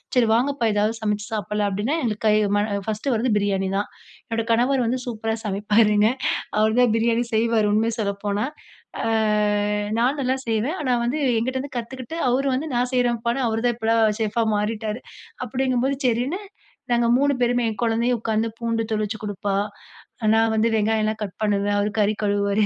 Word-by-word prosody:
சரி 245 -2 +4
வாங்கப்பா! 250 0 +1
ஏதாவது 210 +2 +1
சமைச்சு 210 -1 -1
சாப்பலாம் 210 0 -1
அப்டின்னா 210 +10 -1
எங்க 215 -3 -1
கை, 210 - +5 0.2
ம 205 - +2 0.3
பர்ஸ்டு 220 +4 -1
வந்து 240 +1 0
பிரியாணி 195 -2 0
தான். 205 - -2 0.4
என்னுடைய 230 0 -2
கணவர் 250 +2 +2
வந்து 255 +2 0
சூப்பரா 225 -1 -2
சமைப்பாருங்க. 210 +1 +3 0.5
அவர் 220 +2 +2
தான் 240 -3 +4
பிரியாணி 230 +1 +1
செய்வாரு 220 -1 +2
உண்மய 225 +2 +1
சொல்லப்போனா. 200 +1 -1 0.6
ஆ, - - 0 0.9
நான் 250 +4 +2
நல்லா 260 0 +1
செய்வேன். 230 - 0
ஆனா 260 - 0
வந்து 250 +5 -1 0.2
என்கிட்டருந்து 260 +4 -3
கத்துக்கிட்டு 255 +4 -6
அவர் 260 +3 +1
வந்து 290 +5 -3
நான் 245 +1 +1
செய்றேன்பா, 235 -2 +1 0.2
அவரு 220 0 -1
தான் 240 -1 +2
இப்பலாம் 225 0 +2 0.2
சேஃப்பா 225 +1 0 0.2
மாறிட்டாரு 215 +1 -2 0.5
அப்டிங்கும்போது 260 +2 0
சரின்னு 250 - 0 0.5
நாங்க 235 0 +3
3 285 +1 +2
பேருமே 245 0 +2
என் 220 - -4
குழந்தையும் 235 +1 +1
உட்காந்து 220 0 0
பூண்டு 230 -1 -1
தொளிச்சு 215 0 -1
கொடுப்பா, 205 -1 -3 0.8
நான் 225 0 +3
வந்து 220 +1 +2
வெங்காயம்லாம் 215 0 +1
கட் 200 -3 -4
பண்ணுவேன், 205 -1 +1
அவரு 205 +1 +1
கறி 210 0 +3
கழுவுவாரு. 200 0 +1
225 Hz, 160 wpm, -23 LUFS, 210-245 Hz, 0.9 s, கை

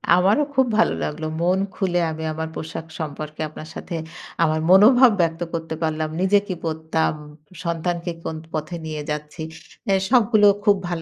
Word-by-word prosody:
আমারও 200 +11 +4
খুব 265 -1 +5
ভালো 225 - +4
লাগলো। 155 +1 -3 0.2
মন 180 +2 +2 0.2
খুলে 180 -3 0
আমি 160 0 -6
আমার 160 +1 -3
পোশাক 160 0 -6
সম্পর্কে 155 0 -5
আপনার 155 +1 -10
সাথে 175 - -6 0.5
আমার 155 -1 +2
মনোভাব 235 +7 +7
ব্যক্ত 165 0 0
করতে 165 -1 -3
পারলাম। 155 -1 -1
নিজে 200 +2 +4
কি 185 - -3
পড়তাম, 160 0 0 0.5
সন্তানকে 170 +1 -2
কোন 160 - -4 0.2
পথে 155 +2 -3
নিয়ে 155 -1 -4
যাচ্ছি। 150 +2 -5 0.5
অ্যা 195 - +3
সবগুলো 220 -4 +5 0.2
খুব 205 - +6
ভালো 175 -2 -3
165 Hz, 160 wpm, -22 LUFS, 155-190 Hz, 0.5 s, মনোভাব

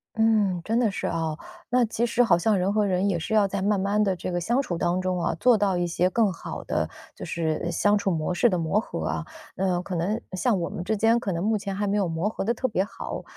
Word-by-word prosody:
嗯， 215 -5 +2
真 225 +5 0
的 230 -4 +2
是 - - -3
哦， 160 -2 -2 0.3
那 250 0 +3
其 230 +1 -1
实 240 +1 +1
好 225 - +4
像 205 +2 +2
人 185 +2 +1
和 210 0 +2
人 190 +1 +1
也 185 - +1
是 170 +6 -4
要 210 -2 +4
在 195 0 -3
慢 205 0 +2
慢 200 +2 +1
地 195 -2 +1
这 180 - -5
个 175 - -1
相 235 +10 +1
处 175 -11 -3
当 175 +2 0
中 185 -1 -1
啊， - - 0
做 245 +2 +5
到 200 -2 +1
一 175 0 0
些 175 +1 +1
更 215 +1 +2
好 170 - -7
的 - - 0 0.3
就 - - -7
是 165 0 -2
相 205 +3 +3
处 200 -1 0
模 160 0 -1
式 180 +7 +3
的 185 -6 +1
磨 165 +5 +1
合 225 - -4
啊。 - - -2 0.3
那 185 -2 0
可 180 0 -5
能 200 +7 -1
像 195 +2 +1
我 170 - -2
们 175 - -5
之 220 +4 0
间， 225 +3 +3
可 205 - -3
能 170 0 -2
目 215 +1 +2
前 200 -1 -4
还 205 +1 -1
没 200 +1 +1
有 200 -3 +1
磨 165 +5 -1
合 - - -4
得 230 +4 +1
特 260 +2 -1
别 200 -5 0
好， 205 - -6
195 Hz, 290 characters per minute, -25 LUFS, 175-220 Hz, 0.3 s, 做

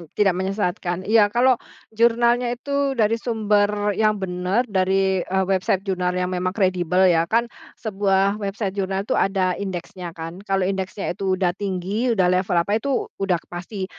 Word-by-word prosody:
Tidak 190 +4 +1
menyesatkan? 185 -1 -2
Iya, 210 -1 +4
kalau 245 +3 +3 0.3
jurnalnya 235 +2 +3
itu 280 0 -1
dari 225 +1 +2
sumber 210 -3 +1
yang 215 +1 +2
benar 190 +4 -1
dari, 190 -2 +1
eee, 190 +1 0
website 190 +1 0
jurnal 180 -2 -1
yang 180 0 -1
memang 185 +2 -2
kredibel 185 -2 +2
ya. 170 -2 +3
Kan 230 +1 +2 0.3
sebuah 200 -1 0
website 200 0 -3
jurnal 190 0 -2
itu - - -3
ada 190 -2 +1
indeksnya 185 -1 -5
kan, 165 +3 -7
kalau 195 -1 +1
indeksnya 190 0 -2
itu 190 +1 -1
udah 180 -2 +1
tinggi, 200 +5 -2
udah 180 -2 +3
level 180 -1 +1
apa 200 +6 +1
itu, 275 +2 -2
udah 195 -2 +2 0.2
pasti 185 +3 -5
195 Hz, 160 wpm, -22 LUFS, 185-215 Hz, 0.3 s, Iya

